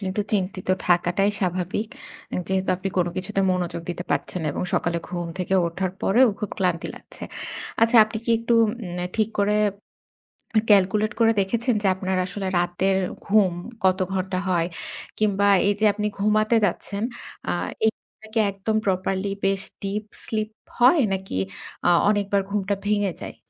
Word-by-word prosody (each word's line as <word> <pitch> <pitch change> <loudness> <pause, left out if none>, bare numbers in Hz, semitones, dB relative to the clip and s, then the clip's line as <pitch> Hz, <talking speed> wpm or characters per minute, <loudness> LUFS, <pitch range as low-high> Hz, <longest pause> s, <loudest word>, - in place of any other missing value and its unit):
কিন্তু 190 +1 -2
চিন্তিত 190 -2 -1 0.2
থাকাটাই 175 +3 +3
স্বাভাবিক। 185 +3 -1 0.6
যেহেতু 190 0 0
আপনি 190 +1 -3
কোন 180 -1 +3
কিছুতে 195 +1 -1
মনোযোগ 180 -2 -2
দিতে 175 0 -5
পারছেন - - -1
না 155 - -2
এবং - - -3
সকালে 170 -1 +1
ঘুম 175 -1 -3
থেকে 185 +1 0
উঠার 185 +2 -2
পরেও 240 +5 +5
খুব 210 - -3
ক্লান্তি 180 -3 0
লাগছে। - - -14 0.6
আচ্ছা 230 +1 +5
আপনি 220 +1 -6
কি 235 - -1
একটু 230 +1 -1
উম 215 - +1 0.5
ঠিক 220 -1 +2
করে, 205 +1 +3 1.1
ক্যালকুলেট 210 +2 +4
করে 225 0 +6
দেখেছেন 235 +5 +1
যে 200 - +1
আপনার 190 0 -2
আসলে 195 +1 -5
রাতের 175 +2 +1 0.3
ঘুম 200 -3 +4 0.3
কত 185 0 +4 0.2
ঘন্টা 185 0 -1
হয় 170 -2 +2 0.5
কিংবা 205 -1 +2 0.2
এইযে 205 +1 +1
আপনি 210 +1 -2
ঘুমাতে 215 +2 +3
যাচ্ছেন 200 +3 -3 0.5
আ - - +1 0.4
এটা 220 0 -5
কি - - +2
একদম 200 +3 -2
প্রপারলি 190 +1 0 0.2
বেশ 195 0 +2 0.2
ডিপ 200 +2 -2 0.2
স্লিপ 215 -1 -1 0.3
হয় 255 +7 +6
নাকি 190 - -4 0.5
আ - - +5 0.2
অনেকবার 200 -1 +2
ঘুমটা 200 0 0
ভেঙে 205 -3 +1
যায়? - - -7
195 Hz, 150 wpm, -24 LUFS, 185-210 Hz, 1.1 s, করে